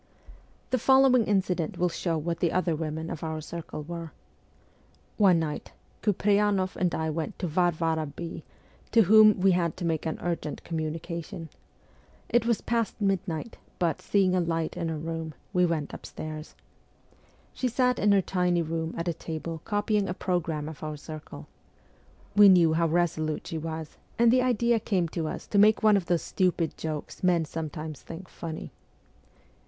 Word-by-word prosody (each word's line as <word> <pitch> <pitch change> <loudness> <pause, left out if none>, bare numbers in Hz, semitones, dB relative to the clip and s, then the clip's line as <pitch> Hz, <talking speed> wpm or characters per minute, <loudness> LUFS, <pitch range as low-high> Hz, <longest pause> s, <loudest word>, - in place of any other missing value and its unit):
The 255 - +2
following 265 -1 +5
incident 185 -5 0
will 180 - +2
show 170 -1 -1
what 165 +2 -3
the 170 - +1
other 180 -3 +1
women 160 +1 -4
of 160 - -6
our 160 -1 -3
circle 160 -1 -7
were. 165 0 -7 1.0
One 195 -5 +5
night, 155 -2 -3 0.3
Kupreyanoff 205 -2 +2
and 180 -2 0
I 160 0 -1
went 160 0 -4
to - - -3
Varvara 165 -2 +1
B., 165 +4 -7 0.5
to 230 - +7
whom 215 +1 +7
we 190 +1 +5
had 170 -3 0
to 180 - -4
make 160 -1 -1
an 160 - -2
urgent 170 -3 -3
communication. 165 +2 -5 0.8
It 240 -1 +2
was 235 -3 +1
past 230 -2 -1
midnight, 195 -1 -1 0.2
but, 170 -3 0
seeing 195 -3 +2
a 185 - +3
light 165 -2 -1
in 165 - -2
her 160 - -2
window, 160 0 -5 0.2
we 180 -1 +4
went 155 -4 -2
upstairs. 155 0 -7 1.0
She 255 - -1
sat 250 +1 +1
in 205 - +4
her 195 -1 +4
tiny 180 -2 +1
room 160 +1 -3
at 170 - -3
a 170 - +1
table 160 0 -6
copying 205 -1 0
a 180 - -2
programme 165 -5 -1
of 155 -2 -9
our 155 -1 -4
circle. 150 - -9 0.9
We 205 -1 +9
knew 170 -4 +6
how 165 +1 +2
resolute 160 -2 0
s - - -7
she 165 - -3
was, 160 -1 -6 0.2
and 235 0 +5
the 255 - +4
idea 235 -2 +2
came 185 -5 0
to 160 -1 -3
us - - -5
to 205 - +1
make 215 +2 +5
one 215 -1 +6
of 190 -3 0
those 175 -2 +1
stupid 180 -4 0
jokes 155 -2 -5
men 175 -3 +3
sometimes 155 -1 -6
think 170 +3 -9
funny. 160 -2 -7
170 Hz, 170 wpm, -27 LUFS, 160-195 Hz, 1.0 s, We